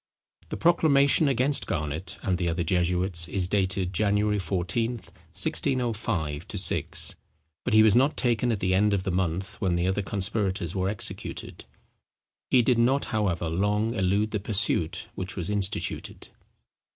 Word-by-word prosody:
The - - -4
proclamation 155 -3 +4
against 135 +2 +1
Garnet 80 +4 -3
and 90 -1 0
the 85 -2 0
other 85 +1 -1
jesuits, 90 0 +1
is 90 -1 -1
dated 95 -1 0
January 105 +2 +1
14, 95 +6 -1
1605 110 - -2
6; - - +1 0.5
but - - 0
he 110 - +8
was 110 -2 +5
not 135 +5 +3
taken 120 -1 +1
at 110 - -2
the 95 -1 +1
end 100 +2 +3
of 95 - -2
the 95 - -2
month 95 +3 -2
when 95 -4 +1
the 85 0 0
other 95 +2 0
conspirators 95 -3 -2
were 95 0 0
executed. 105 - -5 0.8
He 125 -2 +5
did 120 -1 +2
not, 130 +4 +2
however, 95 -6 0
long 105 +6 0
elude 105 0 +1
the 105 - -1
pursuit 95 -4 0
which 95 -1 -5
was 90 +1 -3
instituted. 100 -1 -3
100 Hz, 150 wpm, -26 LUFS, 90-110 Hz, 0.8 s, he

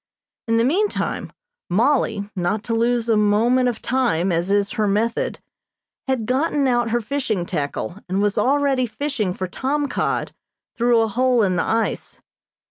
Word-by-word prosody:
In 230 0 +2
the 230 - +3
meantime 385 - -1 0.4
Mollie, 220 0 +1
not 200 +4 -1
to 230 - -3
lose 235 +1 +1
a 225 - +3
moment 225 +5 +3
of 235 - -6
time, 230 -9 +1
as 170 +2 0
is 200 0 +2
her 215 -2 0
method, 220 +4 0 0.7
had 260 -4 0
gotten 275 +3 +1
out 240 -2 +1
her 240 +1 0
fishing 225 -7 -2
tackle 170 +3 -4
and 190 +2 0
was 205 0 +1
already 275 -2 +2
fishing 220 -3 -2
for 185 +1 -4
tom 285 +9 -1
cod - - -2 0.4
through 240 -1 +3
a 225 - +2
hole 245 +1 +2
in 185 -2 +1
the 180 - +1
ice. 225 0 -2
230 Hz, 160 wpm, -21 LUFS, 205-255 Hz, 0.7 s, the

